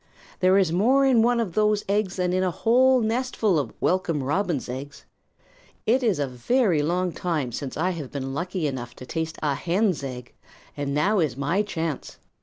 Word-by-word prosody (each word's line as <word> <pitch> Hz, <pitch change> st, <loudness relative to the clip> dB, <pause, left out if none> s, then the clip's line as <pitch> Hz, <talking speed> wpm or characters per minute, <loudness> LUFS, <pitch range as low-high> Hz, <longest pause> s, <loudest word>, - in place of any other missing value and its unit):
"There 185 Hz, +1 st, +4 dB
is 190 Hz, -5 st, +3 dB
more 250 Hz, +10 st, +3 dB
in 255 Hz, -4 st, +4 dB
one 240 Hz, +1 st, +3 dB
of 210 Hz, -7 st, -2 dB
those 210 Hz, 0 st, +2 dB
eggs 200 Hz, -1 st, 0 dB
than 180 Hz, -1 st, 0 dB
in 185 Hz, -, +1 dB
a 185 Hz, -, +1 dB
whole 250 Hz, +7 st, +3 dB
nestful 225 Hz, -5 st, +1 dB
of 130 Hz, -6 st, -3 dB
Welcome 170 Hz, -6 st, 0 dB
Robin's 160 Hz, 0 st, -1 dB
eggs. 135 Hz, +3 st, -7 dB, 0.8 s
It 250 Hz, +4 st, +3 dB
is 220 Hz, -7 st, +1 dB
a 145 Hz, -, 0 dB
very 165 Hz, -, +1 dB
long 175 Hz, +4 st, 0 dB
time 160 Hz, -8 st, -2 dB
since 130 Hz, +3 st, -5 dB
I 180 Hz, +4 st, +1 dB
have 155 Hz, -7 st, -6 dB
been 135 Hz, -1 st, -4 dB
lucky 175 Hz, +3 st, -3 dB
enough 125 Hz, -4 st, -4 dB
to 125 Hz, -, -10 dB
taste 160 Hz, +3 st, -4 dB
a 145 Hz, -2 st, +2 dB
hen's 175 Hz, +3 st, 0 dB
egg, 125 Hz, -2 st, -7 dB, 0.4 s
and 145 Hz, -1 st, -3 dB
now 200 Hz, +7 st, +2 dB
is 155 Hz, -6 st, 0 dB
my 155 Hz, +9 st, +1 dB
chance. 165 Hz, -8 st, -4 dB
175 Hz, 190 wpm, -25 LUFS, 145-210 Hz, 0.8 s, There